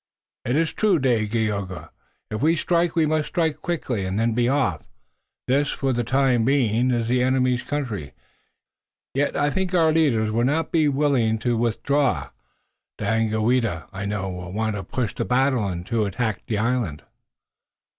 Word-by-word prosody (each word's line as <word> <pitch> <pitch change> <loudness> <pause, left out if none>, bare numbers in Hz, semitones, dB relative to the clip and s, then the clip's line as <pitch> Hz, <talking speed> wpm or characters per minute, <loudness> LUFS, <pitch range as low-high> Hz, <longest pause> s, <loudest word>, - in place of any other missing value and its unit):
"It 125 - 0
is 160 +1 +1
true, 210 -5 +2
Dagaeoga. 110 - -1 0.4
If 110 - -3
we 160 +3 +3
strike 170 +1 +1
we 165 -2 +3
must 155 0 0
strike 160 -4 -1
quickly 135 - -2
and 95 +2 -2
then 115 0 +1
be 120 +1 +1
off. 90 - +1 0.7
This, 140 +3 +2
for 135 -1 -1
the 120 0 0
time 125 -1 +2
being, 125 -2 +2
is 120 -2 0
the 125 +1 +2
enemy's 125 -1 +2
country, 115 - -4 1.0
yet 140 +2 0
I 145 - +2
think 185 +2 -1
our 165 -2 +4
leaders 130 -10 +2
will 115 +2 +1
not 155 +5 0
be 160 -3 +3
willing 135 -6 +2
to 120 -1 +2
withdraw. 125 +5 0 0.7
Daganoweda, 110 -3 0
I 100 +1 -5
know, 100 -1 -2
will 90 -1 -7
want 110 +1 -1
to 100 - -4
push 115 +3 -3
the - - -2
battle 125 -3 +1
and 90 -2 -4
to 115 -1 0
attack 105 +1 -1
on - - -31
the 110 - -1
island." 110 - -1
120 Hz, 165 wpm, -23 LUFS, 110-145 Hz, 1.0 s, our